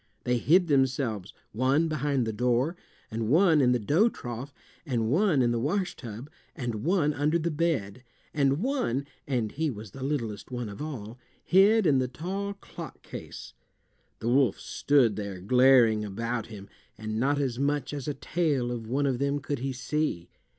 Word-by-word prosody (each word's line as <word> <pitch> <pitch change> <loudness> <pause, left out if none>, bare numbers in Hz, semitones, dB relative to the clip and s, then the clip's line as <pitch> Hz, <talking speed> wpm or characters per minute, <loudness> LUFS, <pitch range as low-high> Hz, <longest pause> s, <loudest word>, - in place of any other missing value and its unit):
They 125 0 +1
hid 175 +8 +4
themselves 130 - +1 0.2
one 135 +8 +2
behind 145 -4 0
the 110 - -2
door, 125 +8 +1 0.4
and 110 0 -2
one 160 +1 +5
in 125 -2 +4
the 125 - +3
dough 155 - +3
trough, 120 - -7 0.3
and 120 -6 -1
one 165 -4 +3
in 120 - +2
the 120 - 0
wash 180 - -1
tub, 115 +2 -8 0.3
and 120 -7 -4
one 160 -3 +2
under 150 +4 +1
the 170 0 -1
bed, 145 -9 -1 0.3
and 140 +3 +1
one 240 - 0 0.2
(and 120 -6 -1
he 160 +2 -1
was 105 -5 -8
the 135 - -10
littlest 120 -7 -3
one 120 -3 -4
of 100 - -8
all) 125 -6 -6 0.2
hid 200 +3 +5
in 140 -5 +4
the 130 - 0
tall 190 +10 -4
clock 200 - -10
case. - - -9 0.7
The 115 - -1
wolf 130 -3 +3
stood 130 -7 +2
there 100 -3 -5
glaring 120 +1 +5
about 115 +3 -3
him, 100 -3 -10 0.3
and 110 0 -4
not 140 +4 +2
as 130 -4 -1
much 145 0 0
as 145 -1 -5
a 145 - -2
tail 145 -4 0
of 115 -2 -5
one 135 +5 0
of 130 -3 0
them 140 +1 +1
could 140 -1 -3
he 135 +2 -2
see. 130 - -2
135 Hz, 180 wpm, -28 LUFS, 115-150 Hz, 0.7 s, one